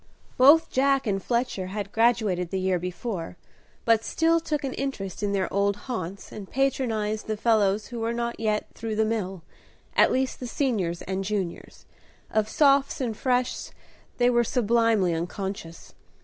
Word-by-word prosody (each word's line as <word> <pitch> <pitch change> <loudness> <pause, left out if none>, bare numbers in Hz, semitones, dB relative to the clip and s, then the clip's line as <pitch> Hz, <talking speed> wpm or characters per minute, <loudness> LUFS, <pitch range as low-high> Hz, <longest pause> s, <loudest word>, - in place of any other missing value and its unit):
Both 290 +6 +6
Jack 275 0 +2
and 195 -3 0
Fletcher 235 -4 -1
had 200 +1 -5
graduated 220 -7 +2
the 190 - -2
year 185 -1 +1
before, 180 0 -5 0.5
but 225 -1 +4
still 330 +5 +2
took 300 -3 -2
an 270 - -2
interest 215 -10 -4
in 205 -1 0
their 190 -3 0
old 200 +1 +2
haunts, 195 -6 -5
and 200 -3 -8
patronized 225 -6 -1
the 215 -1 -2
fellows 210 -2 +2
who 240 - -5
were 225 +1 -1
not 235 0 -3
yet 215 -1 0
through 225 -1 -4
the 220 +1 +2
mill, 195 -5 -3 0.5
at - - +5
least 260 0 0
the 250 - -5
Seniors 210 - -1
and 190 0 -3
Juniors; 195 -3 -4 0.5
of 215 0 +1
Sophs 280 -2 +3
and 240 -5 -2
Freshs 250 +1 -1 0.4
they 245 0 +4
were 240 0 +3
sublimely 230 -5 +2
unconscious. 175 0 -5
220 Hz, 160 wpm, -26 LUFS, 195-245 Hz, 0.5 s, Both